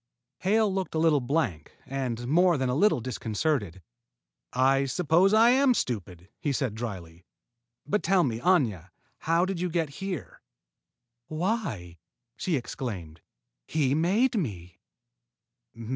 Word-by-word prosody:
Hale 210 +1 +2
looked 190 -4 -3
a - - +1
little 160 -2 +4
blank 130 - -2
and 125 -3 -3
more 175 +3 +4
than 130 -1 -1
a - - 0
little 200 - +3
disconcerted. 110 - -2 0.7
"I 135 +2 +3
suppose 170 +7 +3
I 225 +2 +6
am 260 -1 +4
stupid," 90 - -4
he 145 - -1
said 130 -5 -1
dryly. 90 -7 -7 0.6
"But 205 +9 0
tell 190 -2 +3
me, 115 -5 -1
Aña, 115 - +1 0.3
how 165 +2 +2
did 185 -2 -3
you 180 - -1
get 165 -3 -1
here?" 190 -7 -5 0.9
"Why," 155 - -3 0.4
she 170 - -1
exclaimed, 105 - -5 0.5
"he 140 -4 +1
made 195 - +2
me!" 90 - -4
140 Hz, 130 wpm, -27 LUFS, 110-180 Hz, 0.9 s, I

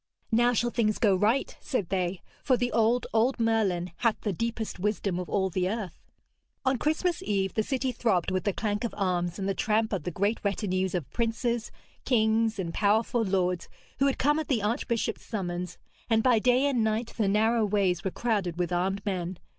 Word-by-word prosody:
'Now 240 +2 +4
shall 240 +1 +1
things 215 -3 +1
go 200 -4 +3
right,' 215 +8 +1
said 230 - -2
they, 185 -1 -1 0.2
'for 255 - +3
the 245 0 -1
old, 230 +2 +2
old 235 +4 +2
Merlin 205 -6 +1
hath 230 -3 +1
the 205 - -1
deepest 230 +1 -3
wisdom 195 -2 -1
of 180 - -5
all 190 -2 0
the 185 +1 0
earth.' 210 -5 -5 0.6
On 260 0 +2
Christmas 325 +6 0
Eve 195 -2 -1
the 220 - +1
city 260 +3 -1
throbbed 210 -7 0
with 185 0 0
the 205 - +2
clank 205 +2 -2
of 235 - -3
arms 175 -3 0
and 195 - -3
the 195 - +1
tramp 220 +2 0
of 190 - -1
the 160 - -3
great 200 +6 0
retinues 190 -2 -1
of 170 -6 -2
princes, 235 0 -1 0.3
kings 225 -2 +2
and 170 -4 -3
powerful 220 +4 +2
lords 185 -3 0 0.3
who 275 - +4
had 275 - 0
come 295 +3 +2
at 315 - -4
the 235 -7 0
archbishop's 230 +1 -1
summons, 180 -4 -4 0.3
and 225 -1 +3
by 245 -3 +4
day 250 +4 +3
and 260 -5 +2
night 220 +2 -1
the 215 - +2
narrow 220 +3 +3
ways 195 -4 +1
were 190 - 0
crowded 195 -6 -1
with 180 0 -1
armed 190 +3 -1
men. 185 -3 -2
215 Hz, 195 wpm, -28 LUFS, 185-235 Hz, 0.6 s, Now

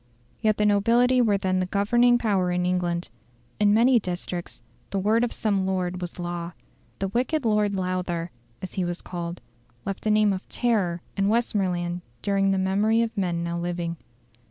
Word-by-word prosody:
Yet 215 -1 +2
the 210 - +2
nobility 235 +5 +4
were 210 -4 +3
then 185 -1 0
the 185 - -1
governing 240 +5 +3
power 200 -6 +1
in 180 0 0
England. 175 -1 -1 0.5
In 205 -1 +4
many 235 +3 +5
districts 175 -2 -5 0.3
the 200 - -2
word 215 +4 +2
of 245 - 0
some 200 -3 0
lord 185 -1 -1
was 175 -1 -5
law. 175 -1 -4 0.4
The 195 - -2
"wicked 255 +6 0
Lord 210 -2 +2
Lowther," 180 -2 -2 0.3
as 185 - -6
he 185 - -1
was 175 0 -4
called, 175 -1 -5 0.4
left 195 +2 -4
a - - +3
name 210 -1 +4
of 185 - -6
terror 195 -8 0
in 195 0 +1
Westmoreland 180 -6 0 0.2
during 195 -1 +2
the 195 - +2
memory 205 +4 +2
of 230 -1 -4
men 175 -4 -1
now 170 0 -2
living. 170 -1 -3
195 Hz, 175 wpm, -25 LUFS, 175-215 Hz, 0.5 s, many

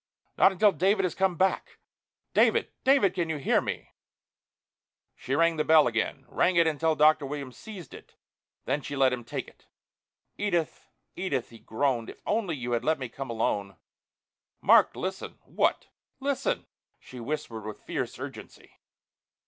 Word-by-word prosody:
"Not - - +6
until 205 +2 +4
David 195 +2 +2
has 185 - 0
come 190 -2 +1
back.... 190 +3 0 0.6
David, - - +3
David, 260 -9 +4
can 175 -3 -2
you 160 - -1
hear 140 - +2
me?" - - -5 1.2
She 135 - -3
rang 165 +1 +3
the 155 - +2
bell 155 -1 +6
again, 120 +3 -1
rang 180 - +1
it 170 -1 +5
until 160 0 +1
Dr. 155 0 +5
Williams 140 -3 -6
seized 190 -9 -10
it, - - -13 0.5
then 145 - 0
she 145 - -6
let 135 -2 +3
him 125 -1 -4
take 115 - -5
it. - - -19 0.7
"Edith, 175 -6 -1 0.3
Edith," 140 -11 -2
he 115 - -13
groaned. 120 0 -1
"If - - -11
only 205 -6 0
you 125 -3 -5
had 120 -1 0
let 155 +2 +2
me 130 -3 -5
come 135 +2 -7
alone...." 100 -5 -2 0.8
"Mark, - - +5
listen!" 190 +1 -5
"What?" - - 0 0.3
"Listen!" 280 - -1 0.3
she 125 - -11
whispered 120 -4 -4
with 110 - -8
fierce - - -4
urgency. - - -10
155 Hz, 155 wpm, -28 LUFS, 130-185 Hz, 1.2 s, Not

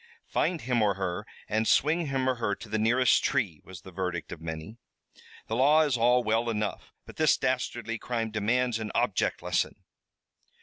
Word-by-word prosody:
"Find 175 -3 0
him 125 -2 0
or 105 -2 +2
her, 95 +2 -3 0.2
and 110 +1 0
swing 160 +3 +3
him 135 -1 -1
or 130 -1 +1
her 105 -3 -1
to 110 - -11
the 110 +1 -1
nearest 120 +3 +3
tree," 105 - 0
was 95 -4 -11
the 95 - -12
verdict 90 -3 -4
of 80 - -8
many. 80 +7 -6 0.7
"The 110 - -3
law 145 +5 +5
is 145 -4 +1
all 125 +1 +3
well 115 +2 +1
enough, 105 -2 -3
but - - -13
this 155 -2 +4
dastardly 120 -3 -2
crime 115 -2 -3
demands 115 +3 +1
an 110 -1 -4
object - - 0
lesson." - - 0
115 Hz, 180 wpm, -28 LUFS, 105-125 Hz, 0.7 s, law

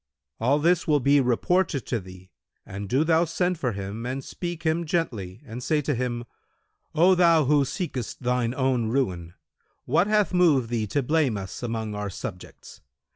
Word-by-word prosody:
All 130 +6 +3
this 170 +4 +2
will 150 -2 +4
be 140 +2 +4
reported 140 +4 +1
to 120 - -1
thee 95 -1 -13 0.3
and 100 +1 -7
do 135 +6 +3
thou 165 +1 +3
send 175 +1 -1
for 125 -7 -1
him 100 +3 -5
and 130 +2 -4
speak 175 +2 -6
him 160 +1 +1
gently 130 - -3
and 120 0 -7
say 155 +4 +1
to 145 - 0
him, 120 -1 -2 0.7
'O 180 +4 +5
thou 170 -4 +4
who 145 +1 +4
seekest 130 - -4
thine 125 -1 0
own 130 -4 +1
ruin, 90 -9 -2 0.5
what 165 +9 +2
hath 210 -2 +2
moved 155 -10 +3
thee 115 -3 -1
to 140 +7 0
blame 145 -5 +1
us 95 -1 -7
among 115 -3 -3
our 105 0 -3
subjects? 90 0 -9
130 Hz, 175 wpm, -25 LUFS, 115-160 Hz, 0.7 s, O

